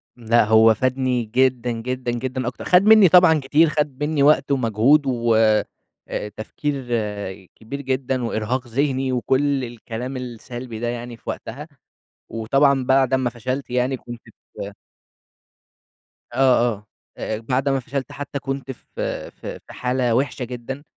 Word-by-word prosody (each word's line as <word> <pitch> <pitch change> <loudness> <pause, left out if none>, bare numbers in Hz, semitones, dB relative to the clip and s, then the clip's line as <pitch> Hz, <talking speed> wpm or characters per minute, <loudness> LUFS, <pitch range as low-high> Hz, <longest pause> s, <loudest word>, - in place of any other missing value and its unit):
لأ 120 -1 +3
هو 110 +1 +6
فادني 130 +1 0
جدًا 125 +1 +1
جدًا 125 +2 -3
جدًا 130 +1 -3
أكتر 125 - -5
خَد 180 +1 +5
مني 215 -4 +7
طبعًا 170 -3 +6
كتير، 150 +4 +3
خَد 150 -2 -2
منّي 150 -2 +1
وقت 140 -1 +4
ومجهود، 130 +3 +3
و 120 -3 +1 0.7
أ 105 - -3
تفكير 135 +4 -4 0.7
كبير 140 +6 -7
جدًا، 130 -1 -1
وإرهاق 120 +3 -2
ذهني 135 +1 0
وكُلّ 135 +2 +1
الكلام 120 +2 -6
السلبي 120 -1 -7
ده 120 - -2
يعني 120 0 -5
في - - -10
وقتها، 140 +8 -6 0.6
وطبعًا 135 +4 +2
بعد 130 0 +3
أمّا 130 -2 +1
فشَلت 130 +3 -4
يعني 125 +1 0
كنت 120 -1 -10
في 100 - -10 1.6
آه، - - -5 0.4
آه. 105 +1 -15 0.3
أ 110 - -3
أ - - -6
بعد 125 +5 -1
أمّا 135 -1 +1
فشَلت 135 +2 -5
حتى 145 0 -5
كنت 135 -1 -5
في 125 - -11 0.4
في - - -8
في - - -12
حالة 125 -2 0
وحشة 135 0 0
جدًا، 125 +3 -7
130 Hz, 145 wpm, -22 LUFS, 120-135 Hz, 1.6 s, مني